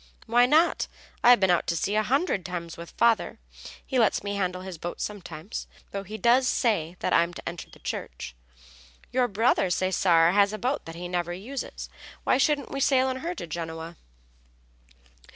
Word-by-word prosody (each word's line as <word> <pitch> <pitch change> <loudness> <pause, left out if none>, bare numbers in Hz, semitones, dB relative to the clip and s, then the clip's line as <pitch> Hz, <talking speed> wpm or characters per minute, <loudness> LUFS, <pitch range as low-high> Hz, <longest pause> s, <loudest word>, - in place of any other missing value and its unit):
"Why 240 +2 +4
not? 315 +5 +3 0.4
I've 245 -1 +8
been 190 -2 +3
out 175 - +1
to 170 - 0
sea 200 - -1
a 215 - +3
hundred 250 - 0
times 170 -2 -5
with 170 0 -9
father. 230 -1 +2 0.5
He 260 -3 0
lets 225 - +2
me 200 0 -3
handle 185 -2 -2
his 185 -3 -7
boat 175 - -5
sometimes, 185 -3 -6 0.2
though 200 - -3
he 210 +3 -7
does 240 +4 +4
say 185 -10 +1
that - - 0
I'm 170 +1 +3
to - - -9
enter 170 0 -6
the - - -16
Church. - - -6 0.8
Your 250 -1 +2
brother, 220 -2 +2
Cesare, 175 -2 +3
has 200 +1 +4
a - - -3
boat 255 +6 -2
that 165 - -8
he 175 +1 -6
never 175 -1 -2
uses. 240 +9 -6 0.4
Why - - +2
shouldn't 290 0 +1
we 275 - -3
sail 265 -1 +3
in 260 - -2
her 340 +6 -4
to - - -6
Genoa?" 165 0 -6
200 Hz, 185 wpm, -26 LUFS, 175-245 Hz, 0.8 s, I've